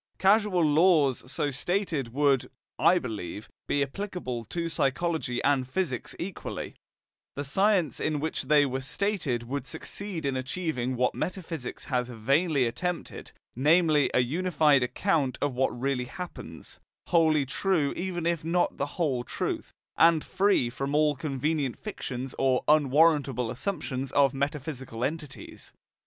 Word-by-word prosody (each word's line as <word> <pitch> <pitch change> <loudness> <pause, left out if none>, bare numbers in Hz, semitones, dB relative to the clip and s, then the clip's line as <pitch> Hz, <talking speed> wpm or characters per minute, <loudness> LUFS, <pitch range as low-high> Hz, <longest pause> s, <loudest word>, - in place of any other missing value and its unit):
Causal 195 -3 +3
laws 150 -5 +3
so 145 - 0
stated 155 - -1
would, 140 0 +2 0.3
I 180 - +5
believe, 110 - -5 0.2
be 145 - +2
applicable 140 - -5
to 170 +9 -3
psychology 150 -3 -1
and 135 -3 +2
physics 145 -6 -2
equally; 180 +1 -5 0.6
the 145 - -3
science 185 +2 +2
in 155 -1 0
which 160 +2 -2
they 150 -1 +5
were 135 0 -2
stated 145 - -1
would 135 +2 -4
succeed 190 +1 -5
in 135 -1 0
achieving 130 -2 -2
what 125 +1 +1
metaphysics 165 -8 -5
has 125 -2 -1
vainly 135 +5 +1
attempted, 175 +10 -4 0.2
namely 150 0 +4
a - - +3
unified 150 0 +3
account 140 +1 0
of 145 -2 0
what 125 -1 0
really 130 -1 -1
happens, 180 +7 -9 0.3
wholly 160 -4 +4
true 155 0 0
even 175 -2 -3
if 170 -2 0
not 175 +2 +1
the 140 - -1
whole 145 -8 +1
of - - -12
truth, - - -3 0.3
and 165 -2 +5
free 195 -9 +2
from 135 +3 -3
all 150 -1 +3
convenient 140 -1 -1
fictions 130 - -5
or 130 -1 +2
unwarrantable 145 -4 +3
assumptions 135 -3 -3
of 140 -1 +4
metaphysical 135 -4 -4
entities. 150 0 -5
145 Hz, 135 wpm, -28 LUFS, 130-170 Hz, 0.6 s, I